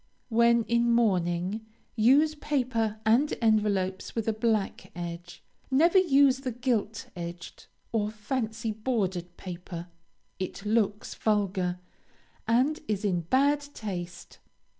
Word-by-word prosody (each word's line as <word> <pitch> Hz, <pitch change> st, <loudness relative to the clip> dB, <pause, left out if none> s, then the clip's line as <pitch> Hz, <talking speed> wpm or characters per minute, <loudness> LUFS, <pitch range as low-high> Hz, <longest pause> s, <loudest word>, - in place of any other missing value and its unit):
When 235 Hz, 0 st, +4 dB
in 235 Hz, +1 st, +2 dB
mourning, 190 Hz, -2 st, +1 dB, 0.3 s
use 275 Hz, +7 st, +5 dB
paper 250 Hz, -8 st, -1 dB
and 240 Hz, +7 st, +4 dB
envelopes 205 Hz, -4 st, +1 dB
with 225 Hz, -2 st, -2 dB
a 225 Hz, -, +2 dB
black 215 Hz, -4 st, -1 dB
edge. 175 Hz, 0 st, -7 dB, 0.3 s
Never 335 Hz, +8 st, +5 dB
use 280 Hz, -6 st, +4 dB
the 265 Hz, -2 st, -3 dB
gilt 240 Hz, 0 st, -2 dB
edged, 170 Hz, -1 st, -8 dB, 0.2 s
or 210 Hz, -2 st, 0 dB
fancy 220 Hz, +1 st, -3 dB
bordered 195 Hz, -6 st, -2 dB
paper; 175 Hz, -1 st, -7 dB, 0.5 s
it 190 Hz, +2 st, -5 dB
looks 210 Hz, -1 st, 0 dB
vulgar, 195 Hz, -4 st, 0 dB, 0.7 s
and 260 Hz, +8 st, +2 dB
is 210 Hz, 0 st, -1 dB
in 180 Hz, -4 st, +1 dB
bad 275 Hz, -, +3 dB, 0.2 s
taste. 180 Hz, -4 st, -6 dB
220 Hz, 115 wpm, -28 LUFS, 185-240 Hz, 0.7 s, use